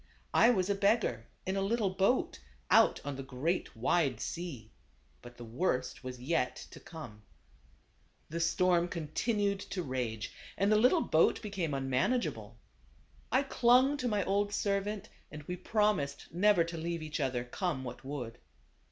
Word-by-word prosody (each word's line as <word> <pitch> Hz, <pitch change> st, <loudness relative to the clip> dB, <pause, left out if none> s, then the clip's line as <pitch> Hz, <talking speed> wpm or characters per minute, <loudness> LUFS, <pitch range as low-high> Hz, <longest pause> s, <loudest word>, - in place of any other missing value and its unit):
I 230 Hz, -, +6 dB
was 190 Hz, -7 st, +2 dB
a 200 Hz, -, +2 dB
beggar, 200 Hz, -, +1 dB, 0.2 s
in 190 Hz, -, -1 dB
a 195 Hz, -, 0 dB
little 205 Hz, 0 st, +1 dB
boat, 195 Hz, +7 st, +1 dB, 0.3 s
out -, -, +5 dB
on 145 Hz, -2 st, -4 dB
the -, -, -4 dB
great, 135 Hz, +7 st, -2 dB
wide 130 Hz, +1 st, +1 dB
sea. 140 Hz, -11 st, -5 dB, 0.5 s
But 120 Hz, 0 st, -13 dB
the 120 Hz, -, -8 dB
worst 125 Hz, 0 st, -1 dB
was 130 Hz, -1 st, -6 dB
yet 130 Hz, -1 st, 0 dB, 0.2 s
to -, -, -11 dB
come. 135 Hz, -11 st, -10 dB, 1.1 s
The 165 Hz, +2 st, -4 dB
storm 175 Hz, +1 st, +2 dB
continued 200 Hz, +5 st, -1 dB
to 190 Hz, -2 st, -4 dB
rage, 120 Hz, -6 st, -3 dB, 0.2 s
and 200 Hz, +2 st, +2 dB
the -, -, +6 dB
little 250 Hz, +10 st, +4 dB
boat 160 Hz, -, +3 dB
became 185 Hz, -8 st, -2 dB
unmanageable. 130 Hz, -, -1 dB, 0.7 s
I 260 Hz, +4 st, +3 dB
clung 255 Hz, +1 st, +4 dB
to 250 Hz, -3 st, -2 dB
my 210 Hz, -4 st, +1 dB
old 205 Hz, +1 st, +1 dB
servant 205 Hz, 0 st, -1 dB, 0.2 s
and 150 Hz, -1 st, -9 dB
we 180 Hz, +4 st, -4 dB
promised 180 Hz, -10 st, 0 dB
never 190 Hz, 0 st, +4 dB
to 170 Hz, 0 st, -6 dB
leave 165 Hz, 0 st, -3 dB
each 155 Hz, 0 st, -4 dB
other, 130 Hz, -3 st, -1 dB
come 135 Hz, +2 st, -3 dB
what 125 Hz, -, -7 dB
would. 130 Hz, -4 st, -6 dB
170 Hz, 155 wpm, -32 LUFS, 130-205 Hz, 1.1 s, I